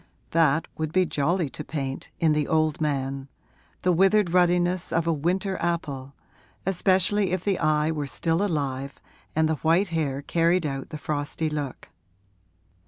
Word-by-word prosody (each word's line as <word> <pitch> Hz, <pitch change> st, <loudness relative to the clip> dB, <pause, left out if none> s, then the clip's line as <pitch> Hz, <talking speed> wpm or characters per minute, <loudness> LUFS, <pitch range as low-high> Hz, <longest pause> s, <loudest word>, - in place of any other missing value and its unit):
That 160 Hz, -1 st, +3 dB
would 155 Hz, -1 st, -1 dB
be 185 Hz, +2 st, +3 dB
jolly 165 Hz, +2 st, 0 dB
to 150 Hz, -, -6 dB
paint, 135 Hz, -3 st, -4 dB
in 160 Hz, -2 st, +3 dB
the 150 Hz, -1 st, 0 dB
old 155 Hz, -1 st, +1 dB
man 135 Hz, -2 st, -2 dB, 0.5 s
the 180 Hz, -, +4 dB
withered 195 Hz, +1 st, +4 dB
ruddiness 180 Hz, 0 st, +2 dB
of 165 Hz, 0 st, +1 dB
a 165 Hz, -, +2 dB
winter 185 Hz, +6 st, -1 dB
apple, 140 Hz, -6 st, -3 dB, 0.5 s
especially 190 Hz, +1 st, +2 dB
if 185 Hz, -1 st, -1 dB
the 195 Hz, -3 st, 0 dB
eye 155 Hz, 0 st, +2 dB
were 150 Hz, -3 st, -3 dB
still 165 Hz, +6 st, 0 dB
alive 140 Hz, -7 st, -2 dB, 0.4 s
and 160 Hz, 0 st, +3 dB
the 160 Hz, -1 st, 0 dB
white 170 Hz, +5 st, +3 dB
hair 145 Hz, -4 st, -1 dB
carried 170 Hz, +3 st, +2 dB
out 135 Hz, -2 st, -4 dB
the 155 Hz, -, -6 dB
frosty 150 Hz, +1 st, -2 dB
look. 145 Hz, -4 st, -5 dB
160 Hz, 155 wpm, -25 LUFS, 145-175 Hz, 0.5 s, the